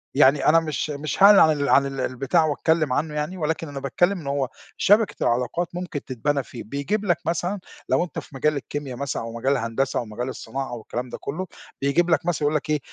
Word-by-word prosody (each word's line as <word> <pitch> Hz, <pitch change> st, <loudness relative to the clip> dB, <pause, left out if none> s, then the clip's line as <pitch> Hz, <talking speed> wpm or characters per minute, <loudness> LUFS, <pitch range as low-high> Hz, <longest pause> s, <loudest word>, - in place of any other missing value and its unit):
يعني 140 Hz, 0 st, +5 dB
أنا 165 Hz, +2 st, +6 dB
مش 155 Hz, -1 st, -3 dB
مش 150 Hz, +6 st, -2 dB
هاعلن 200 Hz, 0 st, +9 dB
عن 155 Hz, -, +7 dB
ال 140 Hz, -, 0 dB
عن 140 Hz, -, +5 dB
ال 135 Hz, -1 st, -5 dB
البتاع 135 Hz, +7 st, +1 dB
وأتكلم 155 Hz, -1 st, +1 dB
عنّه 150 Hz, +2 st, -1 dB
يعني، 150 Hz, +5 st, -3 dB
ولكن 160 Hz, 0 st, -2 dB
أنا 140 Hz, -1 st, -6 dB
باتكلم 175 Hz, +8 st, +1 dB
إن 145 Hz, -, -9 dB
هو 140 Hz, -2 st, 0 dB, 0.3 s
شبكة 210 Hz, +1 st, +4 dB
العلاقات 125 Hz, +9 st, 0 dB
ممكن 175 Hz, -5 st, -4 dB
تتبنى 140 Hz, +2 st, -1 dB
فيه، 120 Hz, -, -9 dB
بيجيب 160 Hz, -, -2 dB
لك 175 Hz, -4 st, +2 dB
مثلًا 175 Hz, +4 st, -1 dB, 0.3 s
لو -, -, +3 dB
أنت 180 Hz, -, -5 dB
في 140 Hz, -, -13 dB
مجال 150 Hz, +3 st, +1 dB
الكيميا 140 Hz, -2 st, -5 dB
مثلًا 140 Hz, -2 st, -3 dB
أو 115 Hz, -, -6 dB
مجال 130 Hz, +4 st, 0 dB
الهندسة 125 Hz, +1 st, -1 dB
أو 120 Hz, -, -4 dB
مجال 120 Hz, +4 st, -4 dB
الصناعة 135 Hz, +1 st, -5 dB
أو 120 Hz, -2 st, -6 dB
الكلام 125 Hz, +3 st, -5 dB
ده -, -, -6 dB
كلّه، 180 Hz, +6 st, -4 dB, 0.3 s
بيجيب 170 Hz, +6 st, +2 dB
لك 160 Hz, 0 st, +2 dB
مثلًا 175 Hz, -2 st, 0 dB
يقول 150 Hz, -, +1 dB
لك 150 Hz, 0 st, -2 dB
إيه، 150 Hz, -1 st, +2 dB
145 Hz, 225 wpm, -24 LUFS, 135-165 Hz, 0.3 s, هاعلن